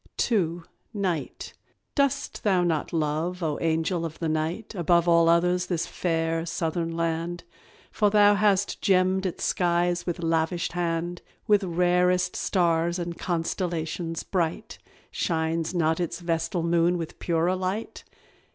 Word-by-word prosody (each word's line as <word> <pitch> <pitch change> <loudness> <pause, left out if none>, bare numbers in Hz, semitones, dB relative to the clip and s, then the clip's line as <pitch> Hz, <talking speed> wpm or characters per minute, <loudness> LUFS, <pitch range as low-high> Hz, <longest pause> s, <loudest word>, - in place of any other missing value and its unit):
II. 175 -6 +1 0.3
NIGHT. 180 -8 -3 0.4
Dost 280 -2 0
thou 190 -4 +3
not 165 -3 -1
love, 165 +3 -1
O 150 -2 -1
angel 165 +1 0
of 165 -1 -5
the 165 - -2
night, 160 +8 -2
Above 175 -2 +2
all 170 -1 +5
others 180 +1 +2
this 175 -3 -1
fair 165 -1 -1
southern 165 0 -2
land? 165 +1 -2 0.5
For 210 -2 +2
thou 205 0 +6
hast 200 -1 +1
gemmed 190 0 +2
its 180 - -5
skies 175 0 +1
with 175 0 -3
lavish 165 +1 0
hand, 175 0 -2 0.2
With 210 -1 +3
rarest 180 +1 +2
stars 170 -2 +1
and 170 -1 -4
constellations 165 -1 -2
bright. 170 -4 -2 0.3
Shines 165 +1 -1
not 160 -1 +1
its 170 -1 -2
vestal 165 0 -1
moon 170 +1 +2
with 165 -2 -6
purer 170 +2 +1
light? 185 +4 -4
170 Hz, 135 wpm, -26 LUFS, 165-180 Hz, 0.5 s, thou